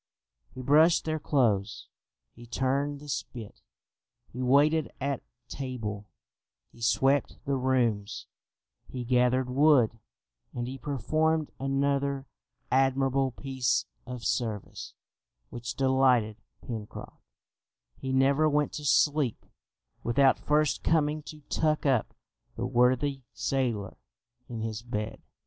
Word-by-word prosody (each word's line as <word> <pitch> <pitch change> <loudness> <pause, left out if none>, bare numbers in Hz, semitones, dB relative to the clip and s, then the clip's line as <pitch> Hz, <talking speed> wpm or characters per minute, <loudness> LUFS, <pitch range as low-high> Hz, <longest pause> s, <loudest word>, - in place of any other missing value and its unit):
He 130 - -6
brushed 155 +5 +5
their 155 0 -1
clothes, 110 -9 0 0.5
he 120 0 -13
turned 140 +4 -1
the 150 - -12
spit, 120 -6 -6 0.7
he 125 - -5
waited 145 +4 +3
at 140 -1 -2 0.3
table, 110 -7 -5 0.6
he 120 - -18
swept 135 +4 +2
the 140 - 0
rooms, 120 -5 0 0.6
he 125 -1 -5
gathered 125 +1 +2
wood, 125 -4 +4 0.6
and 120 0 -3
he 135 +1 -6
performed 155 +4 0
another 140 0 0 0.5
admirable 135 0 +2
piece 130 -2 -1 0.2
of 125 -3 -6
service 110 -2 -3 0.6
which 120 0 -5
delighted 130 -5 +2 0.2
Pencroft 110 -3 -7 0.7
he 130 - -5
never 140 +4 +3
went 150 0 +1
to 150 - -6
sleep 145 -4 +2 0.6
without 135 +3 +3
first 150 0 +1
coming 155 -1 +1
to 150 0 -11
tuck 155 +1 0
up 130 -5 +1 0.4
the 115 - -3
worthy 130 +3 +2
sailor 120 -8 -2 0.5
in 115 -2 -5
his 110 -1 -4
bed. 110 -2 -4
130 Hz, 110 wpm, -28 LUFS, 120-140 Hz, 0.7 s, brushed